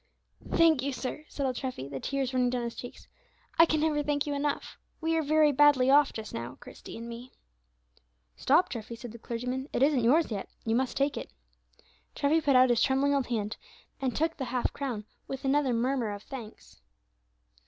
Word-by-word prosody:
"Thank 325 -5 +4
you, 280 +1 -2
sir," 265 +4 -5
said 280 - -3
old 255 -2 -1
Treffy, 255 - -4
the 140 -1 -6
tears 270 - -2
running 250 -1 +2
down 245 -1 -1
his 235 -1 -4
cheeks; 245 - -10 0.5
"I 330 - +8
can 310 -1 +1
never 305 -2 +2
thank 290 0 0
you 290 - -2
enough. 285 0 -2 0.2
We 325 0 0
are 325 - +2
very 305 0 +4
badly 275 -2 +5
off 290 +1 +6
just 220 -1 -7
now, 115 0 -6
Christie 245 -1 -11
and 230 +1 -7
me." 235 +2 -9 1.0
"Stop, 315 +7 +3
Treffy," 230 -1 -6
said 240 0 -9
the 235 - -11
clergyman, 250 +5 -4
"it - - +1
isn't 275 -4 +3
yours 290 +5 +3
yet, 200 -3 -4 0.2
you 225 - +1
must 255 -1 0
take 280 +1 +1
it." - - -6 0.9
Treffy 305 +3 +2
put 285 -3 +2
out 255 0 +6
his 235 - +2
trembling 275 +2 +3
old 275 -2 +1
hand, 215 -3 -2 0.4
and 260 -2 -1
took 325 +2 0
the 265 - -3
half 250 0 -1
crown, 245 -7 -4 0.2
with 270 0 -6
another 275 -1 +2
murmur 240 0 0
of 205 0 -6
thanks. 235 -5 -10
265 Hz, 195 wpm, -29 LUFS, 240-290 Hz, 1.0 s, I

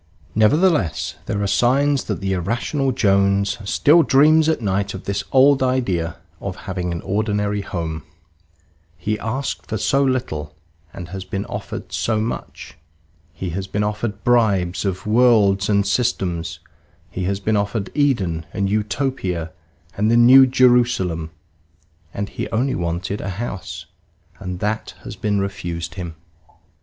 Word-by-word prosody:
Nevertheless, 125 - +2
there 100 - -1
are - - 0
signs 135 +6 +2
that - - -3
the 95 0 -1
irrational 120 - -1
Jones 100 -3 +2
still 160 +4 +5
dreams 155 +2 +5
at 160 - +1
night 100 -2 -1
of 95 - -8
this 100 0 -2
old 135 +1 +5
idea 110 -11 0 0.2
of 95 -2 -5
having 90 -2 -3
an 85 - -4
ordinary 105 0 -1
home. 80 -5 -4 1.0
He 105 +4 -2
asked 130 +5 -3
for 110 - -2
so 135 +7 +2
little, 80 - -2 0.4
and 85 +2 -8
he - - -14
has 95 -1 -5
been 95 +1 -4
offered - - -6
so 110 -2 0
much. 110 +2 -6 0.5
He 90 -1 -5
has 95 +3 -4
been 105 +2 -1
offered 105 -1 -3
bribes 105 -7 +2
of 95 -1 -2
worlds 105 -4 +4
and 100 -1 +3
systems; 90 -7 -1 0.5
he 90 0 -3
has 100 +1 -1
been 110 +2 0
offered 100 0 -1
Eden 95 - 0
and 100 0 -1
Utopia 105 - -2 0.4
and 105 +2 +1
the 115 - +4
New 130 +3 +8
Jerusalem, 120 -11 +2 0.8
and 100 0 -4
he - - -5
only 125 +4 0
wanted 85 +4 -3
a 95 - -4
house; 95 -5 -5 0.5
and 90 -1 -5
that 105 +1 -2
has - - -7
been 105 -1 -1
refused 85 -5 -4
him. 85 -2 -6
100 Hz, 145 wpm, -21 LUFS, 95-120 Hz, 1.0 s, New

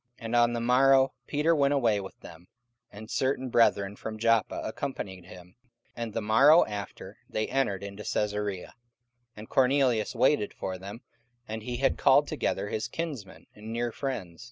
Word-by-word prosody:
And 115 +1 -4
on 120 0 +4
the 120 - -2
morrow 130 +2 +4
Peter 155 +3 +2
went 140 -1 +2
away 115 -7 +2
with 95 - -11
them, 85 +2 -13 0.4
and 110 +2 -10
certain 130 +2 -1
brethren 100 -4 +2
from 110 +1 -7
Joppa 115 -2 +1
accompanied 100 -7 -5
him. 90 0 -14 0.3
44:010:024 - - -37
And 115 -1 -4
the 115 - -1
morrow 135 +10 +6
after 105 -1 -7
they 110 - -1
entered 110 -8 -1
into 100 +1 -8
Caesarea. 105 -3 -2 0.6
And 110 +1 -10
Cornelius 130 -4 +2
waited 125 -2 +2
for 95 -1 -5
them, 100 +5 -9 0.5
and 110 +1 -5
he 120 +2 -4
had 135 +1 +1
called 145 +1 +5
together 105 -9 -2
his 110 - -3
kinsmen 140 - -6
and 110 +1 -10
near 120 +1 -2
friends. 110 -11 -5
115 Hz, 165 wpm, -28 LUFS, 105-130 Hz, 0.6 s, morrow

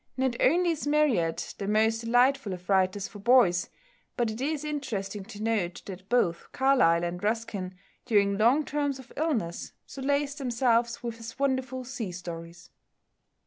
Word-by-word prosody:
Not 260 -2 +1
only 345 +5 +4
is 310 -2 -4
Marryat 270 - +1
the 200 - -3
most 220 +2 +2
delightful 245 -1 +2
of 180 0 -9
writers 190 +1 +2
for 205 - -12
boys, 200 -6 +4 0.5
but 235 -3 +1
it 220 +3 -7
is 300 +1 -1
interesting 230 -10 -4
to 210 0 -8
note 210 -6 -1
that 190 0 -9
both 180 -9 +1
Carlyle 255 -11 +3
and 175 +1 -4
Ruskin 205 -4 -2 0.3
during 200 -3 +3
long 245 +9 +3
terms 285 -2 -1
of 265 -1 -14
illness 240 - -2
solaced 280 +2 -2
themselves 235 -2 +1
with 235 -1 -4
his 230 +1 -9
wonderful 260 -1 -1
sea 245 -6 -5
stories. 170 -1 -9
230 Hz, 150 wpm, -28 LUFS, 195-265 Hz, 0.5 s, only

